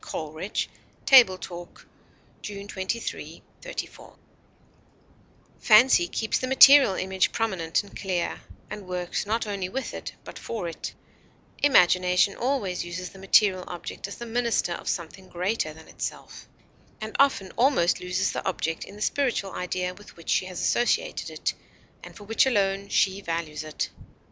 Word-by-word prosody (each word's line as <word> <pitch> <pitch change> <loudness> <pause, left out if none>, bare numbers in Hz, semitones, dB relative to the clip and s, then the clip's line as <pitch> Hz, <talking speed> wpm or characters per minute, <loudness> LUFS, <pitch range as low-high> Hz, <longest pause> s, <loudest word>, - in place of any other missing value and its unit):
COLERIDGE 155 +6 -4 0.4
Table 240 -9 +7
Talk 175 -1 -10 0.6
June 200 -1 -7
23, 205 +4 -5 0.2
'34. - - -8 1.4
Fancy 255 +10 +6
keeps 220 -9 -1
the 255 - -2
material 265 -4 +8
image 190 +1 0
prominent 190 -6 -1
and 200 - -15
clear, 185 -3 -2 0.3
and 210 -3 -7
works 180 +2 -3
not 225 +2 0
only 200 -3 -3
with 265 +6 -4
it, - - -6
but - - -10
for 220 -7 -4
it; 165 - -6 0.7
imagination 180 -7 +4
always 240 -8 -1
uses 175 +1 -6
the 195 - -14
material 190 -1 +4
object 175 +2 -6
as 200 - -8
the 235 - -8
minister 235 -5 0
of - - -5
something 180 +2 -5
greater 180 -1 -1
than 160 +1 -14
itself, - - -7 0.5
and 220 0 -7
often 270 -9 +3
almost 235 -9 +2
loses 180 +1 0
the - - -4
object 165 -3 -2
in 200 - -11
the 210 - -4
spiritual 245 -8 0
idea 180 0 -3
with 205 0 -16
which 170 - -5
she - - +2
has 180 -2 -6
associated 240 - 0
it, - - -2 0.5
and - - -11
for 205 - -11
which 225 +5 +2
alone 200 -4 +1
she 195 +1 +2
values 165 -4 -4
it. 155 -1 -4
195 Hz, 150 wpm, -26 LUFS, 180-225 Hz, 1.4 s, material